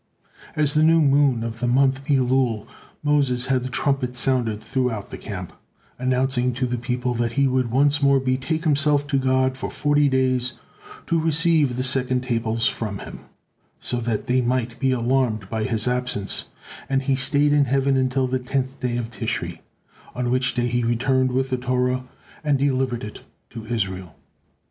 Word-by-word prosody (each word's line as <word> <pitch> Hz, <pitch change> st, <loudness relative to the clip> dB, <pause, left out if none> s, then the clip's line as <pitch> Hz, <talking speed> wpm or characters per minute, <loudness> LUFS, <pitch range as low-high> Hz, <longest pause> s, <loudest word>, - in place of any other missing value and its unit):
At 150 Hz, -2 st, +2 dB
the 155 Hz, +1 st, +2 dB
new 165 Hz, +1 st, +5 dB
moon 140 Hz, -5 st, +3 dB
of 115 Hz, 0 st, -5 dB
the 120 Hz, -, -1 dB
month 135 Hz, +2 st, +2 dB
Elul, 130 Hz, -5 st, +1 dB, 0.4 s
Moses 140 Hz, -4 st, +1 dB
had 130 Hz, -, +1 dB
the 130 Hz, -, -5 dB
trumpet 130 Hz, -2 st, -1 dB
sounded 120 Hz, -4 st, +1 dB
throughout 125 Hz, -6 st, -2 dB
the -, -, -6 dB
camp, -, -, -7 dB, 0.5 s
announcing 130 Hz, 0 st, +1 dB
to 130 Hz, +2 st, -1 dB
the 125 Hz, -1 st, -2 dB
people 125 Hz, 0 st, -2 dB
that 120 Hz, -1 st, -1 dB
he 140 Hz, +1 st, +2 dB
would 130 Hz, -2 st, 0 dB
once 145 Hz, +4 st, +2 dB
more 140 Hz, -1 st, +4 dB
betake 130 Hz, +5 st, -1 dB
himself 145 Hz, -2 st, +2 dB
to 140 Hz, -2 st, 0 dB
God 130 Hz, 0 st, +1 dB
for 130 Hz, -, -5 dB
forty 145 Hz, -1 st, +2 dB
days 130 Hz, -1 st, +1 dB, 0.5 s
to 165 Hz, -2 st, +1 dB
receive 160 Hz, -4 st, +3 dB
the 130 Hz, -, -2 dB
second 130 Hz, -1 st, +1 dB
tables 115 Hz, -2 st, -1 dB
from 110 Hz, -6 st, -1 dB
Him, -, -, -9 dB, 0.6 s
so 125 Hz, -, -3 dB
that 115 Hz, -3 st, -2 dB
they 130 Hz, 0 st, +2 dB
might 120 Hz, -1 st, -1 dB
be 135 Hz, -, +1 dB
alarmed 120 Hz, -4 st, 0 dB
by 110 Hz, -1 st, -1 dB
his 115 Hz, -2 st, -1 dB
absence; 125 Hz, -5 st, -1 dB, 0.4 s
and 135 Hz, 0 st, +1 dB
he 135 Hz, -, +1 dB
stayed 145 Hz, +2 st, +3 dB
in 145 Hz, -1 st, +4 dB
heaven 135 Hz, +1 st, +1 dB
until 130 Hz, 0 st, +1 dB
the 130 Hz, 0 st, -1 dB
tenth 130 Hz, +1 st, -3 dB
day 125 Hz, -2 st, -2 dB
of 120 Hz, -1 st, -4 dB
Tishri, -, -, -4 dB, 0.6 s
on 125 Hz, -1 st, -1 dB
which 130 Hz, -1 st, 0 dB
day 120 Hz, -1 st, 0 dB
he 120 Hz, 0 st, 0 dB
returned 130 Hz, +2 st, +1 dB
with 130 Hz, +1 st, -1 dB
the 130 Hz, -, +1 dB
Torah 125 Hz, 0 st, -1 dB, 0.4 s
and 145 Hz, -2 st, +2 dB
delivered 130 Hz, -3 st, 0 dB
it 105 Hz, -, -8 dB, 0.3 s
to 115 Hz, -2 st, -9 dB
Israel. 95 Hz, -7 st, -3 dB
130 Hz, 175 wpm, -22 LUFS, 120-135 Hz, 0.6 s, new